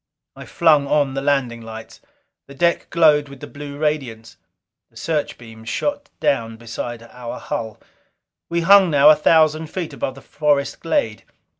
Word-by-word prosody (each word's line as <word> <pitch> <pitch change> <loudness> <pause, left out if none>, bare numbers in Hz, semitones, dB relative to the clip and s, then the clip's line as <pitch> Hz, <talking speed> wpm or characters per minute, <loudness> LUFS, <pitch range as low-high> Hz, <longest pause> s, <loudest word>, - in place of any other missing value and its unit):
I - - -10
flung 155 -5 +3
on 145 -2 +1
the 135 - -3
landing 135 -5 0
lights; 110 0 -10 0.5
the 140 - -13
deck 170 +4 0
glowed 150 -4 +3
with 140 -1 -12
the - - -8
blue 145 -1 -9
radiance; 135 -7 -3 0.5
the 115 - -19
searchbeams 115 -6 -5
shot 285 - -3
down 115 -4 -1
beside 115 0 -7
our 120 0 -8
hull. 110 -1 -5 0.7
We 170 0 0
hung 195 +1 +6
now 145 0 +6
a - - +6
thousand 155 0 +3
feet 170 -1 -5
above 130 0 -4
the 135 - -13
forest 145 -2 -1
glade. 115 -10 -1
140 Hz, 155 wpm, -20 LUFS, 115-155 Hz, 0.7 s, hung